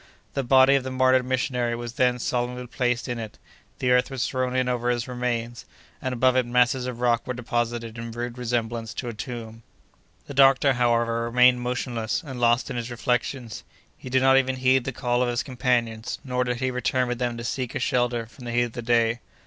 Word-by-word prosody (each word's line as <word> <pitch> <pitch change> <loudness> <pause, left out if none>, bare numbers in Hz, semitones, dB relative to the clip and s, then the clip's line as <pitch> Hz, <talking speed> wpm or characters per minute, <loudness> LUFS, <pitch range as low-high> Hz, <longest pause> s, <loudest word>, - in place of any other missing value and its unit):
The 135 - 0
body 130 +1 +5
of 135 -2 +2
the 130 - -4
martyred 130 0 +3
missionary 125 -2 0
was 120 0 -6
then 125 0 +2
solemnly 125 0 -2
placed 125 -1 -1
in 120 -2 -3
it. 110 -2 -7 0.4
The 125 - 0
earth 125 0 +3
was 135 -2 -2
thrown 130 -1 -2
in 130 -1 +1
over 120 -1 0
his 120 0 -1
remains, 120 -2 -3 0.4
and 130 - -2
above 130 +1 +2
it 130 -2 +2
masses 125 +1 +2
of 120 -1 -6
rock 120 -1 +1
were 125 - -2
deposited, 120 -1 -3
in 115 0 -5
rude 120 +1 -5
resemblance 115 -2 -3
to 120 - -4
a - - -5
tomb. 115 -1 -7 0.6
The - - -8
doctor, 135 0 +5
however, 115 -1 +1
remained 125 +1 +4
motionless, 125 +2 -2
and 130 -3 -7
lost 120 +1 +2
in - - -4
his 120 0 -4
reflections. 120 0 -2 0.3
He 130 - -10
did 130 +1 +2
not 135 0 +6
even 130 -1 +2
heed 130 0 +2
the 135 - -2
call 120 -1 0
of 125 - +1
his 120 0 -1
companions, 120 -3 -1
nor 125 -1 -1
did 125 -1 -1
he 130 0 0
return 125 0 0
with 120 0 -3
them 120 -1 -1
to 115 - -6
seek 125 0 -3
a - - 0
shelter 120 -2 0
from 125 +2 -14
the 120 - -4
heat 120 +1 +2
of 120 -2 -5
the 120 - -5
day. 115 0 +2
125 Hz, 215 wpm, -25 LUFS, 120-130 Hz, 0.6 s, not